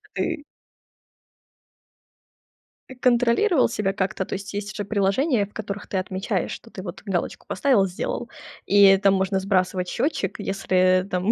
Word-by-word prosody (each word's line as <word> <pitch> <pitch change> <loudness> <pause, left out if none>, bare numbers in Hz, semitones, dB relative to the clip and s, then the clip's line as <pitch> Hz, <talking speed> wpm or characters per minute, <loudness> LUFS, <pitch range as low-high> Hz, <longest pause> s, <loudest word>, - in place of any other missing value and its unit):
А - - -24
ты 330 -4 -2 2.5
Ты 260 - -10
контролировал 250 - +3
себя 210 -5 -1
как-то? 190 0 -2
То - - -14
есть 205 +1 -5
же 205 - -3
приложения, 205 - +1
в 205 - -23
которых 205 -1 -6
ты 195 - -4
отмечаешь, 190 +1 -2
что - - -9
ты - - -8
вот - - -8
галочку - - -3
поставил, 245 -9 +2
сделал, 180 - -4 0.4
и 200 -1 +7
там 195 0 +3
можно 190 0 +1
сбрасывать 185 -1 0
счётчик, 205 - -2
если, 185 -1 +2
там, 185 +3 0
200 Hz, 145 wpm, -24 LUFS, 190-225 Hz, 2.5 s, и